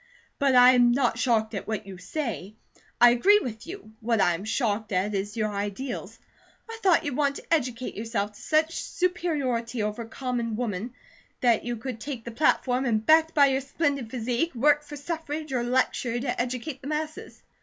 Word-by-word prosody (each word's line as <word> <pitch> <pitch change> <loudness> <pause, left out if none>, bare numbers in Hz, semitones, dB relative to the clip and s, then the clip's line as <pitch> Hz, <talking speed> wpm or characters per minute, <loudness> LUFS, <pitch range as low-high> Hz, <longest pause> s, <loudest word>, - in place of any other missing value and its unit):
"But 275 -3 +3
I 250 0 +9
am 245 -1 +5
not 245 -2 +1
shocked 225 -3 +1
at 200 - -5
what 215 -1 -3
you 190 -2 -10
say, 215 - -4 0.4
I 240 0 +8
agree 385 +13 +5
with 235 - -5
you. 365 - -9
What 230 0 0
I 175 -2 +4
am 175 +5 -5
shocked 220 -2 -1
at 195 +2 0
is 205 +2 -3
your 215 -1 -1
ideals. 205 +6 -4 0.5
I 455 0 -8
thought 365 -5 +3
you'd 285 -3 -2
want 280 -1 +1
to - - -3
educate 255 -5 -1
yourself 210 -1 -3
to - - -15
such 315 +1 +1
superiority 275 -11 -1
over 210 +2 -3
common 235 -1 -3
woman 230 0 -3 0.5
that 235 -4 +3
you 240 0 -2
could 240 0 -6
take 255 -3 -6
the 235 - -5
platform, 255 0 +1
and 220 -3 0
backed 320 +1 +5
by 285 -2 +7
your 270 0 +1
splendid 280 -3 -1
physique, 250 +6 -2
work 290 +4 +4
for 295 0 -9
suffrage 305 -1 -5
or 250 - +1
lecture 240 -1 0
to 245 -1 -1
educate 255 +3 -4
the 270 - -8
masses." 310 +1 -5
245 Hz, 185 wpm, -26 LUFS, 225-285 Hz, 0.5 s, I